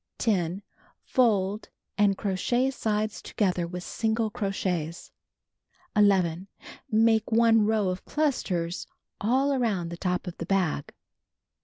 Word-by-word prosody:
10. 190 Hz, -3 st, 0 dB, 0.4 s
Fold, 210 Hz, -4 st, +1 dB, 0.3 s
and 200 Hz, -2 st, +3 dB
crochet 240 Hz, +7 st, 0 dB
sides 215 Hz, -4 st, -2 dB
together 180 Hz, -4 st, -1 dB
with 180 Hz, +1 st, -6 dB
single 220 Hz, +1 st, -1 dB
crochets. 185 Hz, -7 st, -3 dB, 0.8 s
11. 190 Hz, -4 st, +3 dB, 0.4 s
Make 225 Hz, 0 st, +3 dB
1 225 Hz, -1 st, +5 dB
row 215 Hz, -3 st, +2 dB
of 185 Hz, 0 st, -4 dB
clusters 185 Hz, -, -1 dB, 0.3 s
all 260 Hz, +7 st, +2 dB
aroimd 210 Hz, -10 st, 0 dB
the 170 Hz, -, -6 dB
top 180 Hz, +1 st, -1 dB
of 180 Hz, -, -7 dB
the 165 Hz, -, -5 dB
bag. 180 Hz, -7 st, 0 dB
205 Hz, 115 wpm, -27 LUFS, 180-225 Hz, 0.8 s, 1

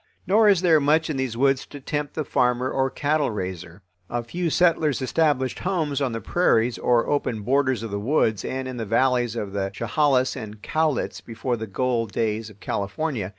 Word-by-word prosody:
Nor 210 Hz, +3 st, +5 dB
is 195 Hz, -4 st, +4 dB
there 165 Hz, -4 st, +5 dB
much 155 Hz, +3 st, +2 dB
in 140 Hz, -, -3 dB
these 130 Hz, -3 st, -2 dB
woods 135 Hz, 0 st, +2 dB
to 145 Hz, -, -10 dB
tempt 145 Hz, +1 st, -4 dB
the 155 Hz, -, -2 dB
farmer 125 Hz, +1 st, +1 dB
or 135 Hz, 0 st, +1 dB
cattle 150 Hz, +2 st, 0 dB
raiser. 90 Hz, -3 st, -6 dB, 0.3 s
A 120 Hz, 0 st, -2 dB
few 170 Hz, +8 st, -2 dB
settlers 160 Hz, -4 st, +2 dB
established 130 Hz, 0 st, 0 dB
homes 160 Hz, -7 st, -1 dB
on 135 Hz, -3 st, 0 dB
the 115 Hz, -, -3 dB
prairies 120 Hz, -7 st, +1 dB
or 120 Hz, -1 st, +2 dB
open 125 Hz, -7 st, -1 dB
borders 130 Hz, -2 st, +1 dB
of 115 Hz, -, -5 dB
the 100 Hz, -, -2 dB
woods 110 Hz, -3 st, +1 dB
and 130 Hz, 0 st, -3 dB
in 130 Hz, -1 st, -6 dB
the 115 Hz, -, -3 dB
valleys 120 Hz, 0 st, +2 dB
of 105 Hz, -4 st, -4 dB
the 100 Hz, -1 st, -1 dB
Chehalis 130 Hz, +4 st, +1 dB
and 110 Hz, -4 st, -8 dB
Cowlitz 155 Hz, -3 st, -1 dB
before 120 Hz, +2 st, -3 dB
the 110 Hz, -1 st, -6 dB
gold 115 Hz, 0 st, -1 dB
days 110 Hz, 0 st, -1 dB
of 105 Hz, -1 st, -17 dB
California. 100 Hz, +2 st, -3 dB
130 Hz, 195 wpm, -24 LUFS, 110-145 Hz, 0.3 s, Nor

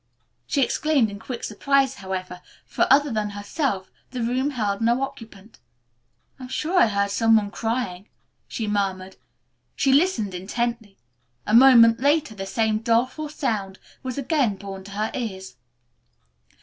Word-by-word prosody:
She 280 Hz, -, +2 dB
exclaimed 280 Hz, -6 st, +1 dB
in 200 Hz, -, -8 dB
quick 245 Hz, +2 st, -7 dB
surprise, 275 Hz, +4 st, +1 dB
however, 185 Hz, -1 st, -5 dB, 0.2 s
for, -, -, 0 dB
other 285 Hz, +2 st, +4 dB
than 215 Hz, -2 st, -1 dB
herself, 205 Hz, 0 st, -3 dB, 0.2 s
the 250 Hz, -2 st, -4 dB
room 255 Hz, +4 st, 0 dB
held 210 Hz, -7 st, -2 dB
no 235 Hz, +3 st, +2 dB
occupant. 220 Hz, -5 st, -9 dB, 0.8 s
"I'm 255 Hz, -, -8 dB
sure 325 Hz, +8 st, 0 dB
I -, -, +6 dB
heard 200 Hz, -1 st, 0 dB
some 225 Hz, +2 st, +3 dB
one 205 Hz, -2 st, -1 dB
crying," 225 Hz, -5 st, -3 dB, 0.4 s
she 225 Hz, -, -4 dB
murmured. 190 Hz, -2 st, -2 dB, 0.6 s
She 270 Hz, -1 st, +2 dB
listened 270 Hz, -, +2 dB
intently. 220 Hz, +2 st, -3 dB, 0.5 s
A 210 Hz, -, -2 dB
moment 230 Hz, -2 st, +7 dB
later 285 Hz, -2 st, +1 dB
the 195 Hz, -2 st, -6 dB
same 220 Hz, 0 st, 0 dB
doleful 245 Hz, +7 st, 0 dB
sound 210 Hz, -10 st, -3 dB, 0.2 s
was 255 Hz, -1 st, -5 dB
again 275 Hz, -6 st, +1 dB
borne 195 Hz, 0 st, -8 dB
to 200 Hz, -, -11 dB
her 215 Hz, +2 st, -2 dB
ears. 190 Hz, -, -5 dB
225 Hz, 145 wpm, -23 LUFS, 200-260 Hz, 0.8 s, moment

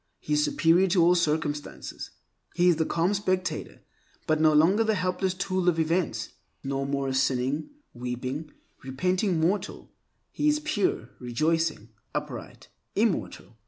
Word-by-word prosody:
He 150 Hz, -, -3 dB
is 150 Hz, 0 st, +3 dB
superior 170 Hz, +5 st, +3 dB
to 180 Hz, -1 st, +3 dB
all 175 Hz, +1 st, +6 dB
circumstances. 150 Hz, -3 st, -2 dB, 0.5 s
He 175 Hz, +1 st, +4 dB
is 170 Hz, -, +3 dB
the 160 Hz, -, 0 dB
calm 170 Hz, +4 st, +1 dB
spectator, 185 Hz, -2 st, -2 dB, 0.4 s
but 155 Hz, 0 st, +1 dB
no 155 Hz, -1 st, +6 dB
longer 170 Hz, +9 st, +4 dB
the 220 Hz, -1 st, +1 dB
helpless 185 Hz, 0 st, -1 dB
tool, 185 Hz, -1 st, 0 dB
of 170 Hz, -, 0 dB
events. 165 Hz, +2 st, 0 dB, 0.3 s
No 135 Hz, 0 st, -2 dB
more 140 Hz, 0 st, -1 dB
a -, -, -2 dB
sinning, 130 Hz, +2 st, 0 dB, 0.2 s
weeping, 125 Hz, +5 st, -4 dB, 0.3 s
repenting 180 Hz, +7 st, 0 dB
mortal, 180 Hz, +6 st, -1 dB, 0.4 s
he 300 Hz, -, 0 dB
is 300 Hz, 0 st, +3 dB
pure, 360 Hz, +6 st, -1 dB
rejoicing, 155 Hz, 0 st, 0 dB, 0.3 s
upright -, -, -6 dB, 0.3 s
immortal. 115 Hz, -, -1 dB
165 Hz, 140 wpm, -27 LUFS, 145-185 Hz, 0.5 s, all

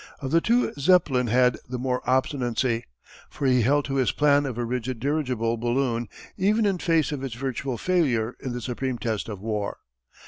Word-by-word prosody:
Of 135 Hz, -1 st, -4 dB
the 165 Hz, -, +4 dB
two 240 Hz, +5 st, +2 dB
Zeppelin 140 Hz, -6 st, +3 dB
had 125 Hz, +2 st, +3 dB
the 125 Hz, -, -3 dB
more 125 Hz, 0 st, -1 dB
obstinacy, 125 Hz, -2 st, 0 dB, 0.4 s
for 140 Hz, -, -5 dB
he 125 Hz, -2 st, +4 dB
held 145 Hz, +5 st, +2 dB
to 135 Hz, 0 st, -2 dB
his 130 Hz, -2 st, +2 dB
plan 145 Hz, -1 st, +3 dB
of 125 Hz, -3 st, -5 dB
a 120 Hz, -, -1 dB
rigid 125 Hz, 0 st, -3 dB
dirigible 125 Hz, -5 st, -1 dB
balloon 120 Hz, -1 st, -1 dB, 0.3 s
even 210 Hz, +3 st, +2 dB
in 195 Hz, -3 st, +1 dB
face 165 Hz, -3 st, +2 dB
of 140 Hz, -2 st, -4 dB
its 130 Hz, -4 st, -4 dB
virtual 130 Hz, 0 st, -3 dB
failure 125 Hz, -8 st, +1 dB
in 130 Hz, -, -5 dB
the 120 Hz, 0 st, -4 dB
supreme 125 Hz, +1 st, -3 dB
test 110 Hz, -1 st, -3 dB
of 100 Hz, -3 st, -6 dB
war. 105 Hz, -2 st, -3 dB
130 Hz, 185 wpm, -25 LUFS, 120-145 Hz, 0.4 s, the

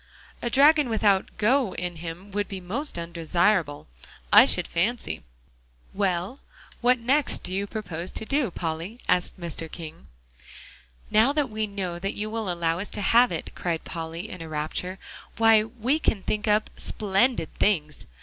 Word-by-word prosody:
"A 240 Hz, -, -1 dB
dragon 290 Hz, +1 st, +5 dB
without 205 Hz, -4 st, +2 dB
'go' 235 Hz, +1 st, +2 dB
in 180 Hz, -1 st, -4 dB
him 170 Hz, +4 st, -8 dB
would 205 Hz, +1 st, -1 dB
be 195 Hz, -, -6 dB
most 230 Hz, -, -4 dB
undesirable, 170 Hz, -1 st, 0 dB, 0.5 s
I -, -, +10 dB
should -, -, +3 dB
fancy. 170 Hz, -, -1 dB, 0.7 s
Well, 195 Hz, +5 st, -1 dB, 0.4 s
what 250 Hz, +1 st, +4 dB
next 260 Hz, +4 st, +1 dB
do 185 Hz, -, -1 dB
you 200 Hz, +1 st, -1 dB
propose 180 Hz, -5 st, -5 dB
to -, -, -2 dB
do, 275 Hz, -1 st, +1 dB
Polly?" 170 Hz, +6 st, -4 dB
asked 180 Hz, +1 st, +1 dB
Mr. 165 Hz, -2 st, -5 dB
King. 165 Hz, -1 st, -9 dB, 1.0 s
"Now 225 Hz, +6 st, +5 dB
that 290 Hz, -5 st, 0 dB
we 215 Hz, 0 st, -1 dB
know 185 Hz, -4 st, -4 dB
that 195 Hz, +2 st, -3 dB
you 215 Hz, +1 st, -3 dB
will 220 Hz, -4 st, -2 dB
allow 170 Hz, -1 st, 0 dB
us 200 Hz, -, -5 dB
to -, -, -2 dB
have 240 Hz, +4 st, +5 dB
it," -, -, -4 dB
cried 170 Hz, -2 st, -3 dB
Polly 165 Hz, +3 st, -5 dB
in 185 Hz, -6 st, -8 dB
a 165 Hz, -, -7 dB
rapture, 155 Hz, +5 st, -3 dB, 0.4 s
"why, 225 Hz, -1 st, +6 dB
we 245 Hz, +6 st, -1 dB
can 205 Hz, -10 st, 0 dB
think 210 Hz, +1 st, -2 dB
up 210 Hz, +1 st, +2 dB
splendid 210 Hz, -1 st, +1 dB
things. 155 Hz, -8 st, 0 dB
200 Hz, 160 wpm, -26 LUFS, 170-225 Hz, 1.0 s, I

